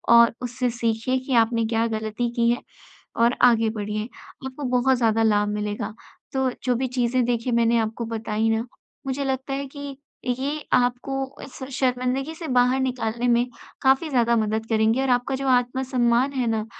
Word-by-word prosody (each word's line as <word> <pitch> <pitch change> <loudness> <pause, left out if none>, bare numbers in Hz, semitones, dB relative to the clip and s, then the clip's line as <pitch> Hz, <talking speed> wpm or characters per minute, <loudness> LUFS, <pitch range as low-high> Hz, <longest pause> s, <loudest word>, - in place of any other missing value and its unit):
और 235 0 +7
उससे 250 0 -1
सीखिए 230 +3 0
कि 270 - -1
आपने 230 0 -1
क्या 225 +1 +1
गलती 220 +2 -2
की 235 0 +3
है 240 - -1 0.6
और 235 +2 +3 0.2
आगे 225 -1 +2
बढ़िए। 210 +1 -2 0.4
आपको 265 +2 -6
बहुत 260 +1 +3
ज़्यादा 225 -2 +2
लाभ 210 -1 +3
मिलेगा, 210 0 -3 0.4
तो 265 -1 +1
जो 250 -1 +1
भी 260 +2 -1
चीज़ें 245 +1 +2
देखिए 240 0 -1
मैंने 235 0 +3
आपको 225 +1 -2
बताई 220 0 -1
ना 225 +2 0 0.4
मुझे 270 +1 -1
लगता 265 0 -2
है 275 +1 -3
कि 285 -1 -7 0.3
ये 275 +5 -2
आपको 245 +2 +1 0.3
इस 275 - -11 0.2
शर्मिंदगी 255 +3 0
से 325 0 -7
बाहर 250 0 +3
निकालने 245 -2 -1
में 240 0 +3 0.4
काफ़ी 270 +4 +3
ज़्यादा 235 -4 +2
मदद 220 0 0
करेंगे 225 +2 +2
और 270 - 0
आपका 245 +2 +1
जो 270 +1 -3
आत्म-सम्मान 250 0 +2
है 255 -3 -1
ना 220 -1 -1
245 Hz, 170 wpm, -24 LUFS, 225-260 Hz, 0.6 s, और